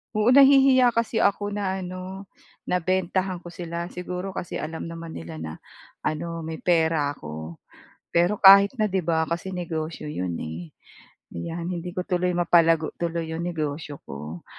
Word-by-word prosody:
Oo, 215 +3 +4
nahihiya 270 -3 +6
kasi 230 -1 0
ako 205 +1 +1
na 195 -2 -2
ano, 185 +2 -8 0.3
na 180 - 0
bentahan 185 0 -1
ko 175 - -9
sila. 170 -1 -5
Siguro 180 +1 -5
kasi 180 - -5
alam 160 +1 -4
naman 165 0 -7
nila 80 - -8
na 80 0 -6 0.5
ano, 165 +2 -3
may 160 0 -6
pera 160 -4 +2
ako. 80 - -8 0.5
Pero 175 +5 +3
kahit 200 +4 +8
na 215 - +1
'di 190 -2 0
ba, 160 -1 +1
kasi 170 +3 -4
negosyo 160 -3 -4
'yon, 90 - -3
eh. 80 +2 -6 0.7
'Yan, 170 - -4
hindi 175 +1 -5
ko 180 0 -4
tuloy 180 -2 0
mapalago 165 -2 +3
tuloy 165 -1 -2
'yong 165 - -3
negosyo 155 -3 -3
ko. 75 +5 -8
170 Hz, 155 wpm, -25 LUFS, 160-190 Hz, 0.7 s, kahit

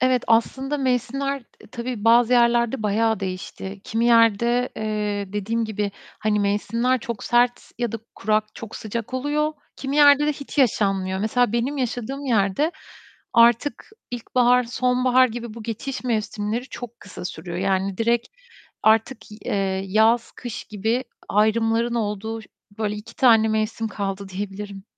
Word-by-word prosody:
evet 255 -1 +3
aslında 265 +5 +1
mevsimler 275 +1 -1
t - - -21
tabii 235 -1 -5
bazı 235 +1 +5
yerlerde 235 0 +3
bayağı 220 +1 +1
değişti. 190 +1 -6
Kimi 225 +1 -1
yerde, 235 +1 +4
eee, 210 -2 -2
dediğim 225 +3 -1
gibi, 210 -1 -2 0.3
hani 210 -1 +1
mevsimler 230 +5 +1
çok 235 -2 -5
sert 245 0 +2
ya 240 -3 -1
da 230 - -3 0.2
kurak, 215 +1 +1
çok 225 -2 -8
sıcak 230 +3 -5
oluyor, 295 +3 0 0.2
kimi 275 +1 -3
yerde 290 0 +7
de - - +3
hiç 280 +1 -9
yaşanmıyor. 195 -6 +2
Mesela 220 +2 +1
benim 240 +5 0
yaşadığım 255 +2 -3
yerde 230 - +1 0.6
artık 235 +4 +4 0.3
ilkbahar, 245 +1 +2
sonbahar 255 +1 +3
gibi 235 -1 -6
bu 230 - -8
geçiş 250 +5 -5
mevsimleri 220 0 -1
çok 240 -1 -8
kısa 185 -2 -9
sürüyor. 170 0 -6
Yani, 195 0 0
direkt 235 +1 +1 0.5
artık, 220 +1 +2
i - - -9
eee, 190 -1 -1
yaz, 225 +3 +3
kış 240 -3 -6
gibi 220 +5 -1 0.2
ayrımların 225 +2 +2
olduğu 220 0 -2 0.4
böyle 210 -2 -1
2 210 - -11
tane 225 -5 +5
mevsim 220 +1 -1
kaldı 195 -1 -4
diyebilirim. 195 +1 -6
230 Hz, 140 wpm, -23 LUFS, 210-245 Hz, 0.6 s, yerde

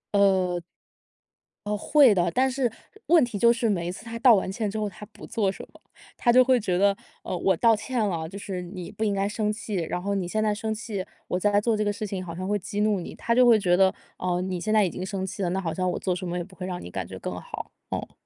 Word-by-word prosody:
呃 190 -3 +3 1.1
呃， 210 - 0
会 270 +3 +5
的。 175 -3 +1
但 260 +9 +2
是 255 -2 0 0.4
问 335 -3 +6
题 230 -4 -5
就 235 +2 +6
是 235 0 0
每 175 -5 0
一 - - -2
次 190 - -10
他 230 0 -6
道 240 -1 +7
完 190 -1 -1
歉 210 +1 -2
之 210 - -4
后 215 -1 -1
他 205 +1 -9
不 220 - -13
做 210 -5 0
什 - - -9
么。 - - -18 0.4
他 240 - +3
就 255 +1 +7
会 255 -1 +4
觉 185 -5 0
得- 200 +1 +4 0.3
呃， - - -3
我 185 0 +2
道 230 +3 +5
歉 240 +4 -3
了 165 -4 -2
就 195 - -8
是 195 -2 -5
你 180 0 -7
不 220 - -4
应 210 -2 +1
该 195 0 0
生 210 0 -1
气， 215 0 -5
然 175 0 -2
后 200 +2 -1
你 190 -3 -1
现 215 +4 0
在 210 -1 +2
生 220 +1 -2
气 215 -4 -4 0.2
我 180 - -1
在 205 +1 +3
做 225 +2 +1
这 215 - 0
个 205 - +1
事 210 +1 -4
情 195 -2 -4
好 170 -2 -7
像 185 +2 -4
会 205 +1 +1
激 205 +2 -3
怒 210 -2 +2
你。 175 - -7
他 235 - 0
就 250 +1 +6
会 230 -2 +7
觉 180 -3 +3
得- 190 +1 +4 0.2
哦， 180 -1 -1
你 185 -1 -3
现 215 - -1
在 215 -2 +5
已 - - 0
经 185 - -5
生 190 -1 -3
气 190 +2 -6
了， 180 - +1
那 185 +2 -1
好 165 -4 -2
像 185 +2 0
我 - - -3
做 185 -2 -1
什 180 0 -5
么 175 +1 -2
也 175 - -2
不 190 +2 -15
会 185 - -6
让 180 -1 -4
你 90 - -9
感 - - -4
觉 - - -8
更 - - -5
好。 - - -7 0.2
嗯。 - - -6
200 Hz, 305 characters per minute, -26 LUFS, 185-220 Hz, 1.1 s, 道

